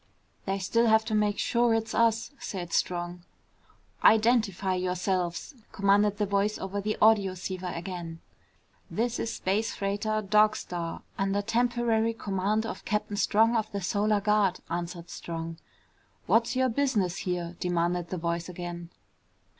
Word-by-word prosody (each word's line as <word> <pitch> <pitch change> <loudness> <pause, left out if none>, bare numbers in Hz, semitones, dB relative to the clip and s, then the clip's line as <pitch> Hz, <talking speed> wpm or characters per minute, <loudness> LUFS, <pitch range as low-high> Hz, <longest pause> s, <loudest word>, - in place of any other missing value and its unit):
"They 195 +1 0
still 230 +5 +2
have 220 0 +4
to 220 - -3
make 210 -1 +2
sure 235 -1 +2
it's 225 0 -2
us," 230 +1 +2
said 175 -3 -5
Strong. 175 0 -1 0.8
"Identify 215 -4 +4
yourselves!" 180 - -1 0.2
commanded 200 +1 +3
the 210 - +1
voice 200 +1 0
over 195 +1 -4
the 215 +1 -2
audioceiver 185 -4 +2
again. 170 -2 -6 0.7
"This 235 +1 -1
is 230 - -2
space 210 +4 -1
freighter 210 +2 -1
Dog 210 +2 +4
Star 170 -2 -5 0.2
under 195 +1 0
temporary 230 0 +1
command 205 +1 -1
of - - -6
Captain 210 0 -2
Strong 225 +3 +3
of 220 -1 -1
the 200 - -3
Solar 205 +2 +1
Guard," 205 -3 +2
answered 170 0 -4
Strong. 165 -1 -6 0.7
"What's 230 +2 +2
your 260 0 +2
business 225 -9 0
here?" 175 -1 -3
demanded 175 0 0
the 185 - -3
voice 170 +1 -2
again. 175 -1 -6
200 Hz, 140 wpm, -28 LUFS, 180-220 Hz, 0.8 s, have